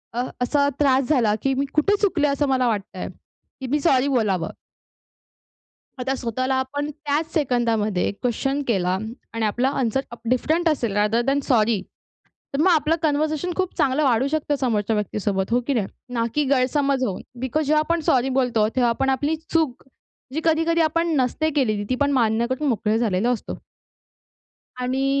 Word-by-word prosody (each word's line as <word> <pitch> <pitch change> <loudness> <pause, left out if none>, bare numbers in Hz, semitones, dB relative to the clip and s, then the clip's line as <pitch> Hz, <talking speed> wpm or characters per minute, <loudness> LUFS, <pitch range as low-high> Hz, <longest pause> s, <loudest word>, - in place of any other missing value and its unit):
अ, 245 - 0 0.2
असा 285 +3 +2
त्रास 270 -2 +3
झाला, 235 -8 +3
की 270 0 +2
मी 280 - +1
कुठे 355 +7 +3
चुकले? 340 -8 +2
असं 280 0 0
मला 255 -2 +2
वाटतंय 210 -3 -3 0.5
की 260 - -5
मी 295 +4 +1
सॉरी 270 -4 +3
बोलावं. 210 -10 0 1.5
आता 260 +2 -1
स्वतःला 255 +3 -2
आपण 285 +3 -2
त्याच 300 +1 -2
सेकंदामध्ये 230 - +1
क्वेश्चन 270 +4 0
केला 185 -4 +1 0.4
आणि 225 -1 -2
आपला 245 +5 +1
आन्सर 250 0 +1
उप 235 - -9
डिफरंट 320 +7 +1
असेल 240 -9 0
रादर 210 +3 +2
दॅन 275 +1 +2
सॉरी. 220 -4 +3 0.7
तर - - 0
मग 370 - +4
आपलं 320 0 +3
कन्व्हर्शन 310 +2 0
खूप 370 -1 -2
चांगलं 280 +3 +2
वाढू 255 0 +3
शकतं 295 -1 -1
समोरच्या 220 -4 0
व्यक्तीसोबत. 205 -1 -2
हो 245 - +3
की 280 - +1
नाही? 210 -5 0 0.3
ना 230 -1 +1
की 295 -1 +2
गैरसमज 275 0 +1
होऊन. 195 - -3 0.2
बिकॉज 275 +4 -1
जेव्हा 305 +1 +3
आपण 335 +2 0
सॉरी 260 0 +3
बोलतो, 230 -4 +2
तेव्हा 245 -2 +3
आपण 270 +3 0
आपली 290 +4 0 0.2
चूक, 315 -7 +1 0.5
जी 315 - -1
कधी-कधी 330 +1 +2
आपण 330 +2 +1
नसते 270 +5 +1
केलेली, 215 -6 +1
ती 255 - +3
पण 285 0 +3
मान्य 230 -2 +2
करून 280 +3 -1
मोकळे 220 -1 +1
झालेला 225 0 +1
असतो. 240 - -4 1.2
आणि 260 +2 0
260 Hz, 165 wpm, -23 LUFS, 230-295 Hz, 1.5 s, मग